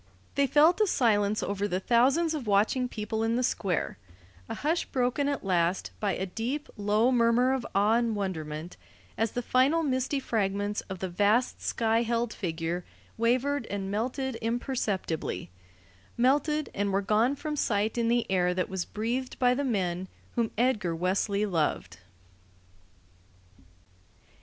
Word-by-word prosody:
They 280 0 +2
felt 315 - +5
a 425 - +4
silence 215 - +2
over 200 0 -1
the 185 -2 -1
thousands 265 - +3
of 285 -7 -4
watching 215 +5 +2
people 220 0 -3
in 225 +1 +1
the 250 - +1
Square, 190 - -1 0.5
a - - -3
hush 320 +4 0
broken 255 +3 0
at 285 -7 -3
last 180 -1 +1
by 205 -2 0
a 190 - -2
deep, 240 - -3
low 210 +4 +2
murmur 245 +1 +3
of 265 -2 -2
awe 210 +3 +4
and 235 -2 0
wonderment 165 -4 -4 0.4
as 225 -1 -1
the 245 - -2
final 275 +8 +3
misty 260 0 0
fragments 205 -4 -1
of 190 - -4
the 190 - -3
vast 205 +7 +1
sky 225 0 +1
held 235 0 -1
figure 170 -1 -3 0.3
wavered 250 +3 +1
and 195 -1 -4
melted 255 +4 -2
imperceptibly 220 - -2 0.7
melted 290 +5 +2
and 200 0 -1
were 195 +1 +1
gone 220 +7 +2
from 300 +1 -4
sight 215 -5 0
in 235 -1 +1
the 235 0 +2
air 180 -1 +1
that 185 - -1
was 190 -2 -3
breathed 240 +4 -3
by 250 -1 +4
the 280 +3 -1
men 190 -7 -1 0.3
whom 230 -2 0
Edgar 215 -8 +1
Wesley 200 +4 0
loved. 150 - -1
225 Hz, 150 wpm, -28 LUFS, 195-255 Hz, 0.7 s, felt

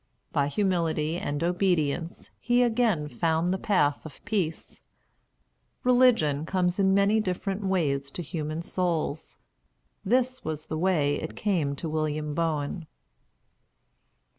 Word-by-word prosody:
By 140 -1 +1
humility 165 -3 0
and 145 0 -3
obedience 170 -3 0
he 245 +1 +3
again 225 -10 +1
found 160 +6 0
the 190 - -2
path 150 -10 +1
of 155 -3 -12
peace. 180 -7 -3 1.0
Religion 245 - +4
comes 180 +2 0
in 190 -1 +4
many 200 +2 +4
different 195 0 -2
ways 145 -8 0
to 175 - -4
human 155 +2 -4
souls. 170 -4 -2 0.7
This 255 +4 +1
was 155 -1 -4
the 155 - -4
way 155 -6 +1
it 160 - -6
came 165 -9 0
to 165 - -5
William 155 -1 -2
Boen. 160 +1 -2
170 Hz, 120 wpm, -27 LUFS, 150-195 Hz, 1.0 s, Religion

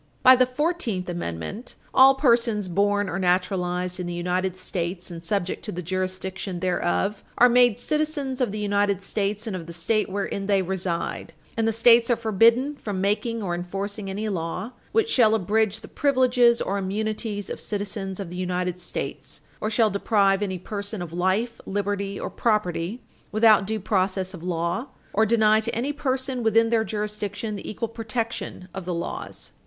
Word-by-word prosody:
By 255 0 +9
the 255 0 +3
Fourteenth 255 - -1
Amendment, 170 - -5 0.2
all 265 +1 +7
persons 235 -6 +2
born 205 +3 +1
or 175 - -3
naturalized 180 0 0
in 180 - -3
the 175 - -4
United 180 +1 -1
States 180 -1 -4
and 165 -1 -8
subject 185 0 -2
to 210 - -3
the 180 -1 -5
jurisdiction 185 +1 -3
thereof 185 +3 0
are 245 - +8
made 245 -2 +4
citizens 300 -4 -1
of 240 -5 +1
the 210 - -4
United 205 -2 +1
States 205 +2 -2
and 215 -4 -3
of 170 -3 -6
the 170 - -7
State 205 +6 0
wherein 195 0 -3
they 200 -2 +3
reside, 180 -3 -3 0.2
and 225 -1 +1
the - - +3
States 230 +1 +5
are 240 - +4
forbidden 230 +6 +3
from 205 -7 -4
making 215 +3 0
or 175 -3 -2
enforcing 195 +3 -4
any 205 +3 -3
law 185 +4 -3 0.2
which 450 -1 +2
shall 225 - +4
abridge 215 +1 +1
the - - -10
privileges 250 -4 +3
or 200 +1 -1
immunities 210 +1 -2
of - - -5
citizens 200 -2 -4
of 190 -4 -5
the 180 - -6
United 180 0 -2
States, 175 - -5 0.2
or 215 - 0
shall 220 -1 +3
deprive 200 0 +2
any 190 -3 -2
person 200 +1 -5
of 165 -2 -9
life, 190 +7 0
liberty, 200 0 -2
or - - -4
property 210 -1 -1 0.3
without 215 -2 +5
due 220 0 -1
process 190 -1 0
of 180 - -9
law, 175 +7 -2 0.3
or 220 +2 +3
deny 215 -1 +4
to 220 +1 -2
any 260 +6 -1
person 260 -2 -2
within 225 0 +3
their 225 -1 +3
jurisdiction 210 0 -3
the - - -7
equal 230 +2 -3
protection 225 -4 -4
of 190 -2 -6
the 180 -1 -2
laws. 170 - -5
205 Hz, 175 wpm, -25 LUFS, 185-230 Hz, 0.3 s, By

